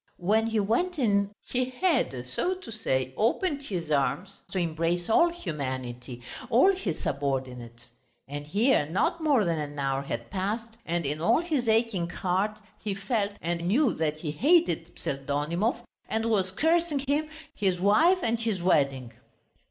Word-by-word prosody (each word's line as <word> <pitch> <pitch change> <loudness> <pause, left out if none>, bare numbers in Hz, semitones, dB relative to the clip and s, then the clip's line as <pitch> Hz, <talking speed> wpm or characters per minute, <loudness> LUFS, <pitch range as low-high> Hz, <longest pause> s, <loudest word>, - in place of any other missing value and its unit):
When 215 +5 +2
he 225 -1 0
went 275 - 0
in 200 -6 +2 0.2
he 255 0 0
had, 255 - 0
so 350 - -1
to 370 -11 -10
say, 130 - -1
opened 280 - +1
his 175 - -4
arms 140 +6 0
to - - -4
embrace 170 0 0
all 340 +9 +5
humanity, 130 - -5 0.3
all 260 - +6
his 215 - -3
subordinates; 125 -4 -3 0.4
and 145 +1 -6
here 205 - +3
not 325 - 0
more 280 -9 +3
than 165 -2 0
an 145 -1 -5
hour 135 -1 0
had 115 -4 -5
passed 215 +4 -3
and 170 -1 -1
in 150 +3 -2
all 170 - +4
his 295 -9 -1
aching 220 -6 +1
heart 190 +4 -1 0.2
he 205 -2 -3
felt 205 0 -1
and 170 0 -1
knew 245 +5 +3
that 155 -1 -1
he 155 -1 -4
hated 175 - +2
Pseldonimov 150 - -1 0.3
and 225 +1 0
was 190 -4 +2
cursing 320 - +1
him, 300 +2 +1 0.2
his 190 -7 0
wife 320 - +4
and 230 0 +1
his 225 -4 -1
wedding. 140 -8 +1
190 Hz, 155 wpm, -28 LUFS, 150-235 Hz, 0.4 s, all